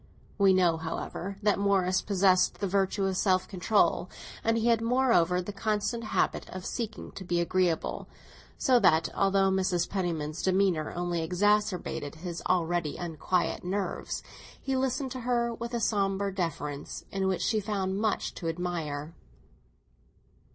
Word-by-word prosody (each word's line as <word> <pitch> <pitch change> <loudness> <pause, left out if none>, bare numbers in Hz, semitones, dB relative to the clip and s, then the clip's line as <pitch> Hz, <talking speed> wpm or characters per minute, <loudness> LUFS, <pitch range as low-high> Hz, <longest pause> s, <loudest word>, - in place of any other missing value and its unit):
We 195 -1 +6
know, 180 -3 +3
however, 170 +4 -5
that 210 -1 +3
Morris 190 -2 +2
possessed 190 -2 +3
the 200 - -2
virtue 195 +1 +1
of 190 -1 0
self 185 -1 +2
control, 200 +2 +1 0.3
and 225 0 +2
he 225 - 0
had, 230 -1 +3
moreover, 230 -8 +3
the 205 - -6
constant 215 +3 -1
habit - - 0
of 185 0 -7
seeking 225 -2 -4
to 190 - -8
be 175 -1 0
agreeable; 175 -1 0 0.5
so 255 -2 +4
that, 165 -6 +4
although 195 -1 +3
Mrs. 185 -2 +1
Penniman's 165 -5 -2
demeanour 185 -4 +1
only 175 -1 -1
exasperated 180 -3 0
his 170 +1 -6
already 175 -3 +1
unquiet 175 +1 -1
nerves, 195 +3 -3 0.4
he 270 -1 -2
listened 260 +1 -1
to 255 - -5
her 240 -1 0
with 235 +1 -5
a - - 0
sombre 200 -2 0
deference 150 -6 -4
in 195 -1 0
which 190 -1 0
she 220 - +2
found 195 -2 -2
much 215 -1 0
to 165 - -5
admire. 165 -3 -3
190 Hz, 145 wpm, -29 LUFS, 175-210 Hz, 0.5 s, We